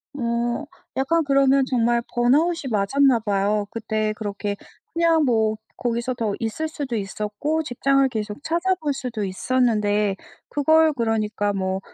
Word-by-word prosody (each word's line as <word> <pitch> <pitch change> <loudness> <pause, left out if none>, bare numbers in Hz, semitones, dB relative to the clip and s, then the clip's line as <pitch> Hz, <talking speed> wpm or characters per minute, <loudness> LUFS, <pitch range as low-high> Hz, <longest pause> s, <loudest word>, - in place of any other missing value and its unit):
어 235 -1 -1 0.3
약간 325 +5 +1
그러면 275 -1 +3
정말 240 -2 +1
번아웃이 280 +5 +2
맞았나 245 +5 +3
봐요. 205 0 0
그때 215 -1 -1
그렇게 205 -1 -4 0.4
그냥 330 -2 +3
뭐 220 -3 +2 0.2
거기서 240 +1 -2
더 225 -4 -2
있을 235 +8 -2
수도 280 -6 -4
있었고 210 +10 -2
직장을 275 +1 +2
계속 215 +3 -5
찾아볼 335 -3 0
수도 245 -6 -4
있었는데 210 -1 +1 0.3
그걸 315 +2 +4
그러니까 215 -4 0
뭐 190 -1 -1
240 Hz, 285 characters per minute, -23 LUFS, 210-280 Hz, 0.4 s, 그걸